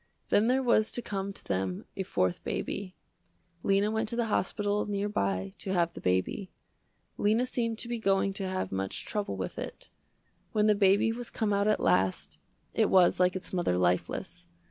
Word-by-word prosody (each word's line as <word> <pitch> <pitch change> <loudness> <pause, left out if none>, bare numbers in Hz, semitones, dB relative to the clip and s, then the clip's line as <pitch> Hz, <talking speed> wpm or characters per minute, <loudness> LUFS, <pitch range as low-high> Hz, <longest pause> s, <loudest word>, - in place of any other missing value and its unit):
Then 210 +2 +4
there 260 +2 +2
was 225 -3 +3
to 240 - -1
come 195 -1 -3
to - - -12
them, 95 -1 -2
a 195 - -2
fourth 90 - 0
baby. 195 -2 -4 0.7
Lena 200 +3 +2
went 220 0 -1
to 235 - -4
the 235 -1 +1
hospital 205 +2 0
near 205 0 -1
by 95 - -1
to 190 - -3
have 170 -2 +1
the - - -9
baby. 95 - 0 0.7
Lena 220 +4 +3
seemed 230 -3 -1
to 235 - -5
be 240 -1 -3
going 195 -2 +2
to 195 -1 -4
have 185 0 -2
much 95 0 -3
trouble 205 - -3
with 95 - -4
it. - - -7 0.6
When 210 -1 +3
the 215 - +6
baby 200 +2 +4
was 240 +1 -5
come 210 -2 -1
out 200 +1 +2
at 215 - +3
last, 90 -5 +1 0.3
it - - +2
was 185 -2 +5
like 180 0 +3
its 185 - -6
mother 175 - +1
lifeless. 90 0 -1
195 Hz, 190 wpm, -29 LUFS, -, 0.7 s, the